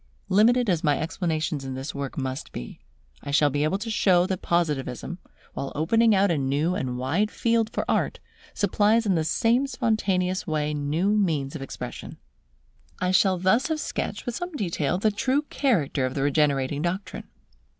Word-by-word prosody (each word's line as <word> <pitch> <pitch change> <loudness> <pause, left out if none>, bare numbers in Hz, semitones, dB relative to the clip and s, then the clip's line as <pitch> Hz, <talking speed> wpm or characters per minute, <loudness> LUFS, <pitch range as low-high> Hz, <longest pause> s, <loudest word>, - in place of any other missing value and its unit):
Limited 230 +5 +4
as 175 -5 +1
my 145 -3 +3
explanations 160 -2 -2
in 135 -1 -5
this 135 +3 -5
work 140 -1 -5
must 130 -1 -4
be, - - -8 0.4
I - - -8
shall 145 0 +3
be 145 +2 0
able 155 +6 +1
to 225 +3 -5
show 180 -4 +4
that 185 -1 -3
Positivism, 165 -1 -1 0.3
while 135 - -4
opening 225 +8 +3
out 195 -1 +3
a 160 - +1
new 140 +6 0
and 130 -7 -3
wide 160 +12 0
field 230 -1 +1
for - - -2
art, - - 0 0.4
supplies 220 +2 +2
in 200 - +2
the 160 -3 +1
same 235 - +2
spontaneous 195 -7 0
way 150 -1 -1
new 150 +7 0
means 160 -9 0
of 150 - -5
expression. 135 - -7 0.8
I 180 0 +1
shall 185 0 +4
thus 190 +8 +2
have 315 -1 -1
sketched - - -4
with 245 - -3
some 355 +7 -5
detail 175 - -1
the 215 +3 +2
true 260 +7 0
character 155 - +1
of 130 - -7
the 135 - 0
regenerating 145 -1 +1
doctrine. 180 +4 -3
175 Hz, 175 wpm, -25 LUFS, 145-210 Hz, 0.8 s, Limited